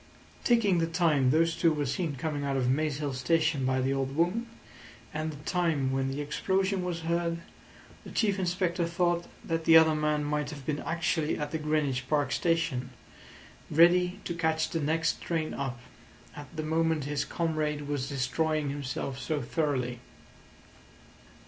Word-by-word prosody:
Taking 210 -7 +3
the 165 - +1
time 160 -6 +2
those 165 +3 +3
two 165 0 +3
were 150 -2 -1
seen 150 +3 -2
coming 145 +2 -3
out 140 -1 0
of 125 -2 +1
Maze 150 +1 0
Hill 145 -2 -2
Station 155 0 +1
by 130 0 +1
the 135 +1 +1
old 135 0 -2
woman, 180 +9 +1 0.7
and 155 0 -2
the 145 -1 -11
time 165 -7 +1
when 135 0 0
the 135 +2 -3
explosion 190 +5 0
was 175 -2 -3
heard, 170 0 0 0.7
the - - -10
Chief 205 -3 +1
Inspector 180 -1 0
thought 175 0 0 0.2
that 165 -1 -2
the 165 -1 +8
other 160 -1 +6
man 150 -1 +1
might 150 0 -1
have 145 -4 -8
been 150 -1 -1
actually 165 -1 -1
at 150 -1 -3
the 160 - -2
Greenwich 145 -4 -1
Park 145 -3 +1
Station, 165 -7 0 0.8
ready 180 +4 +4
to 175 - -2
catch 160 -1 0
the 165 - -1
next 160 +3 0
train 160 -2 -2
up, 135 -3 -4 0.6
at 145 -1 -8
the 155 - -3
moment 160 -1 +1
his 145 0 -1
comrade 155 -3 -2
was 145 -2 -2
destroying 145 +3 0
himself 135 -1 -4
so 145 +4 -1
thoroughly. 125 -2 -1
155 Hz, 165 wpm, -29 LUFS, 140-165 Hz, 0.8 s, the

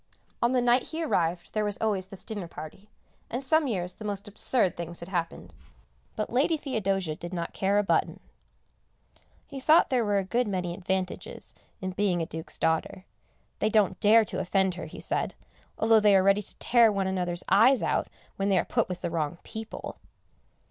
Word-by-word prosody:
On 235 - +3
the 250 -1 +2
night 245 +1 +3
he 325 +1 -3
arrived 175 - -1
there 215 - 0
was 205 -1 -2
always 200 -4 -1
this 190 -1 -10
dinner 205 -6 -5
party, 165 +7 -10 0.4
and 245 +4 -3
some 310 +2 +2
years 180 -6 -2
the 215 - -11
most 205 0 -4
absurd 205 0 0
things 170 0 -6
had 170 - -8
happened, 170 -3 -4 0.6
but 215 +1 -3
Lady 295 +6 +2
Theodosia 195 - -1
did 175 +2 -7
not 170 -1 -4
care 200 +1 +1
a 205 - +3
button. 170 -4 0 1.3
He 275 - -8
thought 305 +3 +5
there 250 -2 +2
were 205 -2 +1
a 195 - +1
good 240 +5 0
many 180 -3 -2
advantages 185 0 -4 0.3
in 185 0 -3
being 190 -2 0
a 165 - -1
Duke's 160 +1 -5
daughter; 165 +3 -1 0.5
they 215 - +2
don't 205 -4 +2
dare 220 +2 +6
to - - -4
offend 190 0 +1
her, 180 - -7
he - - -10
said, - - -2 0.4
although 225 0 +5
they 210 -1 +5
are 190 - +5
ready 195 +1 +4
to - - -9
tear 235 -2 +4
one 195 -2 -1
another's 180 -2 -2
eyes 230 +8 +5
out - - 0 0.3
when 195 +1 0
they 195 - +3
are - - +1
put - - 0
with 180 - -5
the - - -3
wrong 160 0 -2
people. 220 0 -7
195 Hz, 195 wpm, -27 LUFS, 180-220 Hz, 1.3 s, dare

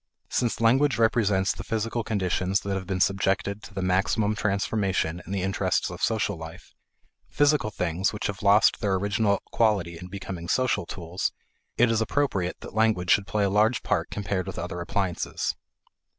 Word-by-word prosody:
Since 120 -2 0
language 130 +5 +3
represents 105 -4 +2
the - - -8
physical 115 +1 -2
conditions 95 -2 0
that 100 0 -3
have 95 -1 -4
been 95 -2 -2
subjected 95 +1 +1
to 105 - -12
the 95 - -2
maximum 100 +3 +1
transformation 100 -4 -1
in - - -7
the 100 -2 -1
interests 95 0 0
of - - -8
social 105 -3 0
life 80 0 -10 0.6
physical 145 -5 +2
things 90 -1 -1
which 105 - -5
have 100 -2 -3
lost 100 +1 +5
their 100 -4 +1
original 100 +1 +1
quality 95 -7 +1
in 90 - -8
becoming 90 -2 -7
social 125 -5 +1
tools 90 +1 -3 0.5
it 120 0 +4
is 115 -1 +1
appropriate 110 -7 -1
that - - -9
language 110 -5 +2
should 100 -2 +3
play 105 -1 0
a 100 - +2
large 110 +4 +2
part - - 0
compared 100 -2 -3
with 95 - -6
other 90 0 -4
appliances. 90 0 -2
100 Hz, 170 wpm, -26 LUFS, 95-110 Hz, 0.6 s, lost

